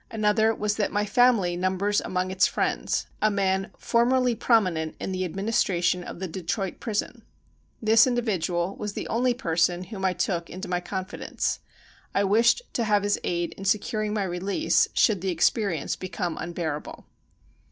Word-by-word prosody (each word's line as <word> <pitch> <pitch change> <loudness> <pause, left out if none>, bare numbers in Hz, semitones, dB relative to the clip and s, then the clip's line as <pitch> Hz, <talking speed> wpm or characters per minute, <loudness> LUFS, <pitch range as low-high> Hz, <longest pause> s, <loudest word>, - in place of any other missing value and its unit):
Another 220 0 +2
was 210 0 -1
that 210 - 0
my 205 0 0
family 220 -6 +3
numbers 190 +3 0
among 185 0 -2
its 190 0 +3
friends - - -1
— - - -33
a 215 - +4
man 195 -1 0
for 235 0 +2
merly 250 0 +2
prominent 185 -9 +1
in - - -4
the 185 0 -2
administration 180 -2 0
of - - -8
the 190 +1 -4
De 185 +3 -6
troit 190 +2 -3
prison. 215 -3 -3 0.6
This 220 +2 +6
individual 195 -7 -1
was 210 -1 -4
the - - -5
only 245 +1 +1
person 175 -4 +1
whom 190 +1 -8
I 190 -1 +2
took 175 -1 -2
into 185 +2 -7
my 180 0 0
confidence. 190 +1 -3 0.6
I 200 - +3
wished 230 - +3
to 235 - 0
have 210 -2 +2
his 205 0 +1
aid 170 -1 -1
in 195 - -7
securing 210 +1 0
my 210 -1 0
release, 190 - +1
should 205 -6 +3
the 190 - -1
ex 170 -3 +3
perience 195 -10 -2
become 180 -2 -3
unbearable. 165 -3 -5
195 Hz, 175 wpm, -26 LUFS, 180-215 Hz, 0.6 s, This